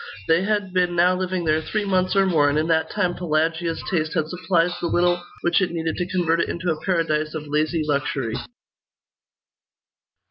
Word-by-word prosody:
They 165 +2 +4
had 205 -2 -1
been 180 -1 +1
now 180 +2 +4
living 185 -1 -2
there 155 0 +2
three 210 +6 -2
months 185 -1 +1
or 195 0 +4
more, 155 -6 +3
and 145 - 0
in 155 - +1
that 160 -1 +2
time 180 -4 0
Pelagia's 165 0 -1
taste 155 -3 -1
had 155 -2 0
supplied 175 -1 +1
the 170 - 0
little 175 +1 +1 0.2
which 175 - +2
it 185 - +1
needed 165 -1 -2
to 180 - -2
convert 170 -2 +1
it - - -1
into 175 0 -2
a 155 - -4
paradise 155 -4 0
of 155 -1 -5
lazy 155 +2 0
luxury. 140 -5 -1
170 Hz, 185 wpm, -23 LUFS, 155-180 Hz, 0.2 s, They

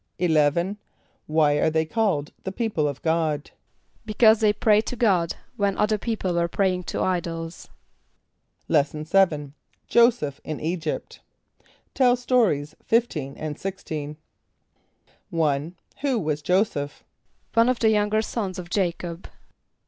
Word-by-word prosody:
= - - -51
=11.= 170 +3 +2 0.5
Why 150 -2 +3
are 160 - +2
they 160 0 +1
called 170 -6 0
"the 190 - -3
people 200 -8 -1
of 140 -2 -5
God"? 160 -3 0 0.5
=Because 220 0 +4
they 215 -2 +4
prayed 210 0 +2
to - - -3
God, 190 -8 +2 0.2
when 200 -1 0
other 210 0 +1
people 210 -5 -2
were 170 0 +1
praying 185 0 0
to - - -2
idols.= 170 -2 -3 1.0
Lesson 150 +1 +1
VII. 155 -5 +2 0.4
Joseph 235 - +3
in 155 - -5
Egypt. 160 -1 -3 0.7
(Tell 250 -2 +4
Stories 230 - +1
15 160 - 0
and 155 -1 -5
16.) 155 -6 -5 1.1
=1.= 155 0 0 0.3
Who 275 -3 0
was 155 -6 -2
J[=o]´[s+]eph? 150 -4 0 0.5
=One 230 +2 +4
of 255 - +1
the 220 -1 +3
younger 210 +1 +2
sous 200 -5 -3
of 175 -1 -8
J[=a]´cob. 175 -2 -2
175 Hz, 130 wpm, -24 LUFS, 155-215 Hz, 1.1 s, =Because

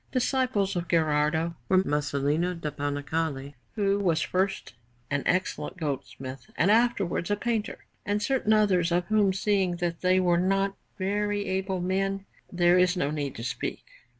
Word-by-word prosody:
Disciples 250 -6 +1
of 175 -1 -2
Gherardo 160 +1 +1 0.2
were 185 0 +4
Masolino 150 +3 0
da 150 -2 -3
Panicale, 145 0 -3 0.2
who 200 -1 +1
was 170 -5 +2
first 190 - -1 0.4
an 145 0 +1
excellent 185 +1 -1
goldsmith 135 -1 -5
and 195 - +4
afterwards 215 -7 +2
a 205 - +2
painter, 225 0 -3 0.2
and 205 0 0
certain 235 0 0
others, 185 -5 +3
of 175 +1 +1
whom, 210 -3 +4
seeing 190 -2 +1
that 170 -1 -3
they 185 0 +3
were 175 -2 +3
not 195 +2 +1 0.2
very 205 +1 -1
able 190 0 -2
men, 195 +2 -1 0.3
there 175 0 +4
is 180 +1 +3
no 145 -4 0
need 145 -3 -3
to 115 - -7
speak. 125 - -4
185 Hz, 150 wpm, -27 LUFS, 160-200 Hz, 0.4 s, were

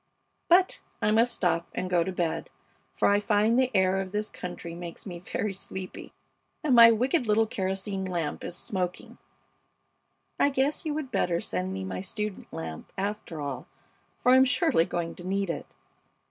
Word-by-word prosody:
But 365 +2 +4 0.2
I 210 - +2
must 230 +3 +4
stop 170 -6 0
and 185 - -2
go 175 -2 +3
to 190 - -3
bed, 175 -3 -2 0.4
for - - +1
I 205 0 +4
find 210 +3 +3
the 260 -1 +3
air 190 0 +3
of 190 -1 -6
this 210 +1 -2
country 175 -1 -7
makes 170 0 -8
me 175 -4 -6
very 195 +3 -3
sleepy, 190 -1 -7 0.5
and 295 -4 +2
my 230 -1 +10
wicked 245 +4 +2
little 215 +1 +4
kerosene 195 -1 -2
lamp 170 -5 -3
is 175 - -5
smoking. 180 -2 -4 1.2
I 285 - +5
guess 275 +3 0
you 295 - -1
would 295 -4 -4
better 170 -1 +1
send 95 - -3
me 95 0 -4
my 95 - -4
student 210 +1 -5
lamp, 80 -1 -7
after 195 -5 -3
all, 140 -3 -5 0.5
for 250 - +3
I'm 260 +1 +8
surely 275 - +3
going 170 -1 -3
to 175 - -9
need 195 0 0
it. - - -6
195 Hz, 175 wpm, -28 LUFS, 175-225 Hz, 1.2 s, my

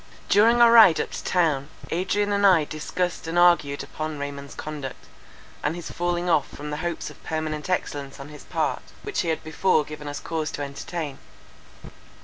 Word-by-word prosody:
During 230 +4 +5
our 235 -1 +8
ride 220 -8 +8
up - - -2
to - - -6
town, 155 -6 +1 0.2
Adrian 205 +4 0
and 200 0 +1
I 185 -5 +6
discussed 165 +3 -3
and 165 +2 -2
argued 170 -5 +4
upon 155 -1 -5
Raymond's 140 0 -6
conduct, 150 -4 -7 0.6
and 155 - -1
his 175 -1 -7
falling 175 0 -1
off 160 -5 +3
from 150 +1 -7
the 150 - -3
hopes 170 +1 -3
of - - -18
permanent 155 0 -3
excellence 140 -7 -2
on 140 +1 -9
his 150 -1 -11
part, - - -1 0.2
which 415 - -3
he 175 - -4
had 160 -1 -1
before 155 0 +2
given 150 -1 -8
us 145 - -4
cause 160 -2 -3
to 145 - -3
entertain. 140 +1 -5
160 Hz, 180 wpm, -25 LUFS, 145-175 Hz, 0.6 s, our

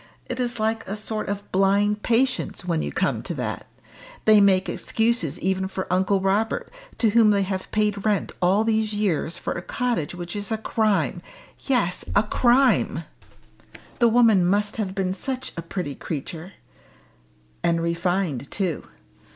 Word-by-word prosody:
It 255 - -5
is 245 -2 -2
like 220 +1 -1
a 200 - -3
sort 215 0 -4
of 200 0 -5
blind 200 +2 +2
patience 250 -5 0
when 165 -3 0
you - - -3
come - - 0
to - - -5
that - - -4 0.6
they 215 -1 +7
make 190 -1 +4
excuses 220 - 0
even 190 +1 0
for 190 0 -4
Uncle 190 +1 +2
Robert, 200 +4 0 0.3
to 225 -3 +3
whom 225 -1 +5
they 200 -1 +3
have 190 0 -4
paid 210 -2 0
rent 210 -3 0
all 190 +4 +3
these 220 -1 0
years 185 -6 -1
for - - -3
a 175 - -5
cottage 235 -7 -2
which 175 +1 -6
is 205 0 -5
a 220 - +1
crime 220 -2 0 0.4
yes, 235 -10 +1
a 205 - +5
crime! 250 +4 +3 1.0
The 235 -1 +5
woman 225 -5 +5
must 205 +4 +1
have 195 -3 -3
been 190 -1 0
such 260 +6 -4
a 170 - -4
pretty 165 -3 -4
creature 160 +6 -6 1.1
and 170 -1 +2
refined 170 -4 -1
too. 185 -7 -2
200 Hz, 160 wpm, -24 LUFS, 185-220 Hz, 1.1 s, they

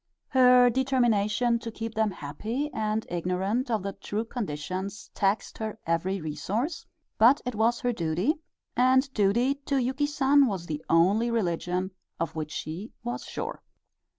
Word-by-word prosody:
Her 250 -1 +6
determination 240 -2 +2
to 230 0 -6
keep 225 0 -5
them 220 -1 +2
happy 215 - -4
and 215 0 -1
ignorant 185 - -1
of 220 -5 0
the 200 0 -3
true 215 +4 -4
conditions 190 - -5
taxed 200 +1 0
her 220 -1 -4
every 175 +4 0
resource, 185 - -3 0.3
but 245 +6 +7
it 250 - -2
was 225 +2 +1
her 245 -1 +1
duty, 180 - 0 0.4
and 260 +2 +3
duty 235 +6 +3
to 280 - +1
Yuki 265 +3 0
San 285 -1 +4
was 190 -6 -3
the 155 -2 -5
only 195 +8 +4
religion 180 -3 -1 0.3
of 165 0 -2
which 155 -1 -3
she 170 +11 -5
was 240 0 -4
sure. - - -5
220 Hz, 150 wpm, -27 LUFS, 185-250 Hz, 0.4 s, but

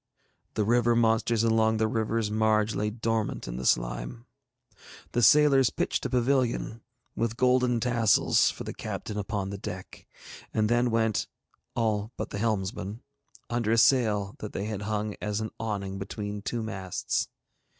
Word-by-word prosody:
The 110 - +1
river 120 +1 +3
monsters 115 0 +2
along 110 -1 +3
the 110 0 +2
river's 110 -1 -1
marge 110 0 +2
lay 105 +1 -1
dormant 110 - -2
in - - -5
the 65 - -2
slime. - - -1 0.9
The 120 - +1
sailors 135 +1 +6
pitched - - -1
a - - -9
pavilion, 125 -2 0 0.3
with 115 0 -1
golden 125 -1 +3
tassels, 120 -2 +3
for - - -6
the - - -6
captain 105 - -5
upon 100 -1 -3
the 100 - -6
deck, 95 -1 -8 0.5
and 105 -1 +2
then 120 +1 +3
went, 110 -2 +1 0.5
all 110 -1 0
but - - -4
the 100 - -4
helmsman, 105 -1 -2 0.4
under 120 -2 -1
a 115 - +3
sail 105 -5 +3
that 105 - -7
they 100 - -3
had 105 -2 -4
hung 105 0 -2
as 105 0 -2
an 110 0 -4
awning 100 -3 -3
between 105 +1 -5
two 115 +3 -3
masts. 95 -4 -2
110 Hz, 155 wpm, -28 LUFS, 105-115 Hz, 0.9 s, sailors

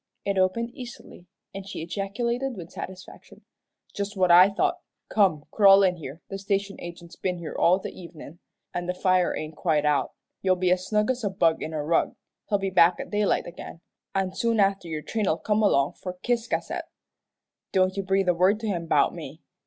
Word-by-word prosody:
It 200 - 0
opened 230 +6 +1
easily, 240 -8 -11 0.3
and 195 0 -6
she 160 - -5
ejaculated 235 +8 -2
with 170 -2 -9
satisfaction, 185 0 -10 0.5
"Just 200 0 -4
what 185 -2 +3
I 180 +3 +8
thought. 200 - 0 0.3
Come, 180 -8 +2
crawl 200 -2 +7
in 180 -2 +2
here; 155 +1 -9
the 195 - -6
station 200 0 -2
agent's 170 0 -9
been 180 -1 -2
here 170 -2 -7
all 180 +2 +4
the 190 - -6
evenin', 170 -2 -11 0.3
an' 175 0 -3
the 180 - -2
fire 185 -1 +2
ain't 155 0 -6
quite 155 -3 +1
out. 150 -1 +1 0.3
You'll 185 -1 +3
be 180 0 +1
as 185 0 +1
snug 210 +2 +2
as 255 -2 -4
a 205 - +1
bug 165 -4 +1
in 160 - -4
a 155 -2 -3
rug. 165 +2 +1 0.3
He'll 205 - +3
be 195 -1 -3
back 175 -1 +5
at - - -7
daylight 210 -1 +1
agin, 170 -1 -9 0.3
an' 190 -1 0
soon 230 -1 0
after 195 -3 +2
your 155 -2 -4
train'll 210 -8 0
come 210 +3 0
along 140 -9 +3
for 180 -1 -6
Ciscasset. 240 -1 -1 0.9
Don't 185 0 +2
you 200 - -1
breathe 195 0 +1
a - - +5
word 185 +5 +3
to 225 - -3
him 170 -5 -2
'bout - - +3
me. - - -9
185 Hz, 195 wpm, -26 LUFS, 170-200 Hz, 0.9 s, I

